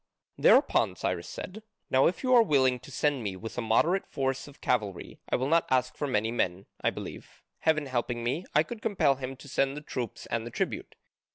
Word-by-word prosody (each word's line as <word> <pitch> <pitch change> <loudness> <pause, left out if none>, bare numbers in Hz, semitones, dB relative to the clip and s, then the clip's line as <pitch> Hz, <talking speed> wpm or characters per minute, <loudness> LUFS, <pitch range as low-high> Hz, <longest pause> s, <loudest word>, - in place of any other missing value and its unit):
Thereupon - - +4
Cyrus 85 -1 -2
said, 205 +4 -7 0.3
"Now 130 +1 +5
if 180 - -2
you 255 0 +3
are 240 - +8
willing 130 - +3
to - - -13
send 145 -1 0
me 100 -4 -3
with 110 +4 -7
a - - -2
moderate 155 - +2
force 135 -1 -2
of 145 - -14
cavalry 105 -7 -2
I - - +2
will 130 - 0
not 165 +2 +3
ask 130 -1 +1
for 145 - -2
many 110 -3 +1
men 95 -5 -1 0.2
I - - +4
believe, - - -9 0.2
heaven 155 -2 +2
helping 120 -2 -2
me, 130 +9 -1
I 150 - +6
could 230 +5 -8
compel 190 - +2
him 130 0 -5
to 135 - -14
send 135 +1 0
the - - -5
troops 125 -5 -5
and 115 -1 -2
the 120 - -6
tribute. - - -3
130 Hz, 210 wpm, -29 LUFS, 120-150 Hz, 0.3 s, are